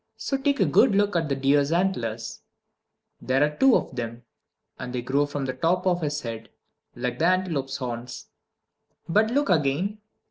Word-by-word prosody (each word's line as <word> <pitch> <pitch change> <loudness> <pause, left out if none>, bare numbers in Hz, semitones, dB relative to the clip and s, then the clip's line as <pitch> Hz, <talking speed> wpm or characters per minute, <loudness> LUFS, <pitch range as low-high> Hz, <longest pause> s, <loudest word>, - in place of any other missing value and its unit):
So 275 - -2
take 280 +1 0
a 195 - +4
good 155 +6 +4
look 205 -1 +2
at 165 -3 0
the 140 - +1
deer's 140 +2 +2
antlers. 115 - -1 0.8
There 130 +2 +2
are 150 0 0
two 265 - +5
of - - -1
them, 115 -1 -5 0.6
and 125 -1 -5
they 120 - -2
grow 140 +3 +1
from 145 -1 -4
the 130 - -2
top 165 +8 0
of 180 -2 +1
his 145 -1 -2
head, 115 -1 -7 0.5
like 125 0 -3
the 165 - +3
antelope's 170 -8 0
horns. 125 -1 -6 0.8
But 215 +6 +3
look 280 -1 +1
again. 170 +7 +1
145 Hz, 175 wpm, -25 LUFS, 125-185 Hz, 0.8 s, two